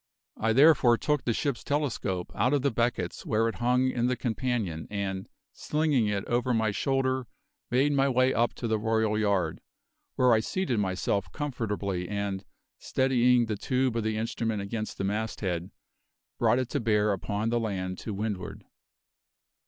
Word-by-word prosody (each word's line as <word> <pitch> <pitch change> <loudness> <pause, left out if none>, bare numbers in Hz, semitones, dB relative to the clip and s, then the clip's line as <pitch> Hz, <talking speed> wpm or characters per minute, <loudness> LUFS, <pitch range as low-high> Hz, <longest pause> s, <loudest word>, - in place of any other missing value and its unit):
I 110 +1 +2
therefore 130 -3 +6
took 150 +1 0
the 120 - +2
ship's 140 +1 -2
telescope 125 -11 -2
out 125 +4 +2
of 140 - 0
the 140 - +2
beckets 115 -6 -1
where 115 0 +1
it 115 - -3
hung 125 +2 +3
in 120 -1 0
the 125 - +1
companion, 115 -9 -2
and, 95 -2 -3 0.2
slinging 150 -7 +1
it 100 -1 -1
over 120 +1 +1
my 110 -2 +1
shoulder, 130 +1 0 0.4
made 135 +4 +3
my 140 -1 +3
way 130 0 +3
up 120 +1 +1
to 120 - -4
the 110 -1 +1
royal 110 -1 +1
yard, 100 -4 0 0.5
where 125 -2 +4
I 110 - +4
seated 130 - -1
myself 95 -2 -1
comfortably 105 - -3
and, 100 -1 -2 0.4
steadying 125 -2 +3
the 110 -1 -2
tube 130 +2 0
of 115 - 0
the 110 0 -1
instrument 115 -1 -2
against 110 +1 -4
the - - -3
masthead, 95 -4 -2 0.7
brought 115 +1 +4
it 130 -1 -1
to 145 - -1
bear 105 -3 +2
upon 105 +3 -2
the 120 0 +1
land 95 -5 -3
to 110 - -5
windward. 100 -2 -4
115 Hz, 165 wpm, -28 LUFS, 105-125 Hz, 0.7 s, therefore